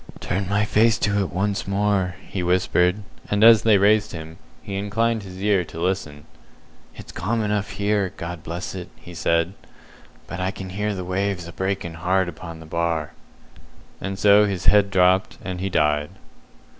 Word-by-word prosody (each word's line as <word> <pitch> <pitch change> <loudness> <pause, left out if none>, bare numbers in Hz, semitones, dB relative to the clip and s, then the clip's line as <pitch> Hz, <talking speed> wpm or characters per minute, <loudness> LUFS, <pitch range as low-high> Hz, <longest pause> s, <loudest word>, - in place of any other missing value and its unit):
"Turn 95 +1 -2
my 100 +1 +2
face 110 +2 +3
to 100 0 0
it 95 - -1
once 100 +3 -1
more," 100 -2 0
he 95 - -4
whispered; 90 +2 +2 0.3
and 105 +1 +2
as 115 -1 +8
they 110 -3 +5
raised 105 +2 +3
him, 80 0 -8 0.2
he 100 - -7
inclined 110 +3 0
his 95 -2 -10
ear 100 -3 +3
to 80 - -9
listen. 85 -5 -2 0.7
"It's - - -11
calm 110 +4 -1
enough 105 -1 -1
here, 100 -2 0
God 85 -1 -6
bless 85 +4 -5
it," 90 -1 -7
he 90 - -13
said; 85 +1 +1 0.7
"but 85 - -7
I 90 +1 0
can 95 -2 -7
hear 105 +1 -2
the 90 -1 -5
waves 95 -1 -2
a 85 - -9
breaking 95 -2 -3
hard 95 +1 +2
upon 85 -1 -8
the 80 - -11
Bar!" 80 -1 -2 0.9
And 95 0 -4
so 105 +1 +6
his 95 -3 -3
head 100 +2 +5
dropped, 95 +1 +3
and 90 -2 -4
he 95 - -1
died. 75 -3 +1
95 Hz, 175 wpm, -23 LUFS, 90-100 Hz, 0.9 s, as